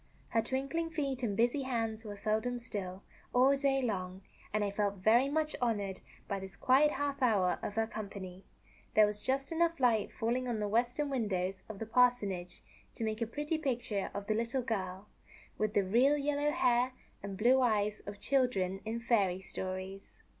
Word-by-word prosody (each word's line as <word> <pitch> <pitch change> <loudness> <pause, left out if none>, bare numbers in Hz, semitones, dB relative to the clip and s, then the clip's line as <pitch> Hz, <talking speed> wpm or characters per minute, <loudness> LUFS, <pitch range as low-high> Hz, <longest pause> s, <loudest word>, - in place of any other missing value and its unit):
Her 225 - +2
twinkling 275 +7 -2
feet 280 -5 -2
and 210 -5 -1
busy 240 +5 +2
hands 225 -4 -2
were 205 -1 -6
seldom 220 +4 -1
still, 195 -5 -5 0.3
all 265 +3 +6
day 270 -1 +1
long, 190 -4 -3 0.3
and 215 0 +1
I 200 - -1
felt 200 0 0
very 225 +8 +4
much 305 +1 0
honored 205 -5 -1 0.3
by 200 - -2
this 190 0 -9
quiet 280 +7 +4
half 285 0 -2
hour 205 -8 +3
of 205 - -4
her 225 0 +2
company. 195 -4 -7 0.5
There 215 - +8
was 210 0 -3
just 270 +4 -1
enough 335 -1 +1
light 230 -5 +2
falling 245 +3 -1
on 235 -3 -1
the 210 - -1
western 245 +7 0
windows 195 -7 -1
of 215 - -6
the 225 - -4
parsonage 220 -6 +1 0.3
to - - -4
make 220 +1 -2
a 230 - +1
pretty 295 +6 -2
picture 240 -8 -1
of 200 0 -4
the 215 - +1
little 235 +4 -1
girl, 195 -3 -3 0.5
with 215 -1 0
the 205 - +4
real 250 +10 +4
yellow 290 +1 +1
hair 255 -6 +2 0.3
and 200 -1 -6
blue 250 +5 +5
eyes 210 -3 +1
of 205 0 -7
children 205 -9 +1
in 225 +2 -3
fairy 200 -6 +2
stories. 190 0 -6
225 Hz, 180 wpm, -33 LUFS, 200-260 Hz, 0.5 s, There